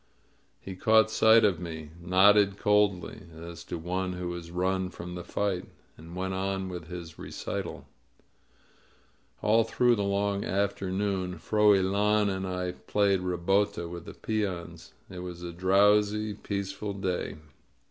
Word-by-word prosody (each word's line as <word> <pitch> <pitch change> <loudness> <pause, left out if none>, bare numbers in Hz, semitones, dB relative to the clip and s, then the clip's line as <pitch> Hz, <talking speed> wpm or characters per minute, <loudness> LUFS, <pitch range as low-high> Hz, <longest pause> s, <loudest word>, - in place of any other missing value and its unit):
He 95 - -8
caught 110 +3 +4
sight 110 0 +6
of 95 -5 +2
me, 80 -3 -7
nodded 100 +3 +5
coldly, 105 -3 +1 0.2
as 85 0 -9
to 85 - -5
one 90 +2 -2
who 90 -1 -4
has 85 -1 -7
run 95 +1 -1
from 90 0 -8
the 90 0 -6
fight, 100 -2 -2 0.3
and 85 +2 -12
went 95 +1 -2
on 95 0 -2
with 90 -3 -7
his 85 -3 -8
recitaL - - -5 1.6
All 115 +2 +4
through 120 +2 +2
the 100 - -1
long 100 0 0
afternoon 95 -1 -1
Froilan 105 +2 +3
and 95 0 -4
I 90 -1 -2
played 100 +1 +1
ribota 90 +1 0
with 85 0 -8
the - - -9
peons. 100 -6 -4
It 90 - -9
was 90 -1 -7
a 85 - -5
drowsy, 105 +4 +3
peaceful 100 0 -4
day. 95 -2 -3
95 Hz, 135 wpm, -28 LUFS, 90-100 Hz, 1.6 s, sight